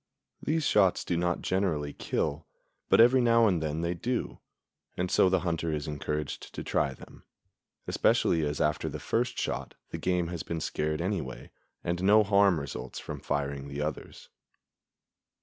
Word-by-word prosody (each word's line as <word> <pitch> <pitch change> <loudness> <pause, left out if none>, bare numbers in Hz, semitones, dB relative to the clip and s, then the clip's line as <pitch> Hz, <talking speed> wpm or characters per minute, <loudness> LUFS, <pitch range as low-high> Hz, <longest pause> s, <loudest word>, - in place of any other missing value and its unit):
These 155 0 0
shots 95 -8 +3
do 85 - 0
not 90 0 0
generally 80 -7 0
kill, 75 +1 -2 0.4
but - - +5
every 125 +3 +7
now 115 -1 +5
and 90 -6 +2
then 80 +1 -2
they 85 +1 0
do; 120 +8 -3 0.6
and 90 0 -1
so 95 - +5
the 95 -1 +2
hunter 85 -2 -1
is 75 -1 -3
encouraged 75 0 -4
to - - -4
try 70 -2 0
them, - - -15 0.6
especially 80 -2 +2
as 75 0 -2
after 75 0 0
the - - -5
first - - -1
shot - - -3 0.2
the - - -4
game 90 -2 0
has 85 -2 -4
been 85 - -4
scared 75 0 -2
anyway, 85 -9 -4 0.3
and 85 +1 -2
no 105 +3 +6
harm 100 -4 +4
results 65 -3 -6
from - - -6
firing 70 -1 -2
the 70 +1 -5
others. 75 0 -5
85 Hz, 165 wpm, -29 LUFS, 75-95 Hz, 0.6 s, every